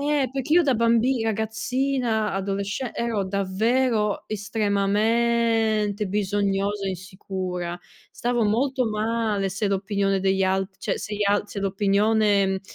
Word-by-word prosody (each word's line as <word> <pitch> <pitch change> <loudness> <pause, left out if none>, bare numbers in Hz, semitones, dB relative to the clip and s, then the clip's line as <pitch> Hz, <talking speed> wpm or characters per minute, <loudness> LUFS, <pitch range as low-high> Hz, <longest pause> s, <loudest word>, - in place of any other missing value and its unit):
Eh, 285 -3 +1
perché 270 +2 -2
io 350 - +6
da 270 -4 +2
bambi 235 +2 +2
ragazzina 225 +1 -1
adolesce 200 +5 -3
ero 225 -4 -1
davvero 210 +3 0
estremamente 215 +1 +1
bisognosa 200 0 -1
e - - 0
insicura. 185 -1 -5 0.4
Stavo 240 -1 0
molto 250 +4 +1
male 215 -2 -1
se 195 +3 -2
l'opinione 195 0 0
degli 190 0 +1
alt 190 0 -1
cioè - - -2
se 210 - -5
gli 210 - 0
al 205 0 +2
se 200 - -6
l'opinione, 200 0 +2
210 Hz, 120 wpm, -24 LUFS, 195-230 Hz, 0.4 s, io